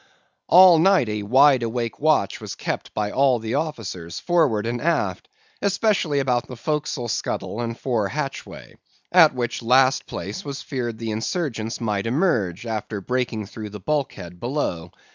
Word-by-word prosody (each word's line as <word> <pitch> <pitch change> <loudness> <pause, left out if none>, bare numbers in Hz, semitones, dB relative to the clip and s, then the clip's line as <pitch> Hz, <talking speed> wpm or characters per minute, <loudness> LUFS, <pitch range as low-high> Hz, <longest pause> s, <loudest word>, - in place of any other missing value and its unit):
"All 180 -1 +8
night 190 - +4
a 105 0 -2
wide 130 +5 +5
awake 115 0 -3
watch 150 -10 +1
was - - -6
kept - - -4
by 105 -1 -1
all 135 -2 +3
the 110 0 -4
officers, 110 - -4
forward 150 -12 +1
and 120 +1 -2
aft, 170 +1 -1 0.3
especially 195 -6 +1
about 125 -3 0
the 125 - -8
forecastle 150 -2 -2
scuttle 110 0 -3
and 115 -1 -4
fore 115 -6 -1
hatchway; 140 +3 -6 0.4
at 165 -6 +6
which 120 -1 -2
last 130 +3 +3
place 100 +4 -5
it - - -10
was 140 -1 -6
feared 120 -5 -4
the 115 0 -4
insurgents 115 - -3
might 105 -2 -1
emerge, 120 - 0
after 110 -2 -4
breaking 120 0 -2
through 105 +1 -8
the 105 0 -9
bulkhead 95 - -3
below. 105 - -3
120 Hz, 160 wpm, -23 LUFS, 110-150 Hz, 0.4 s, All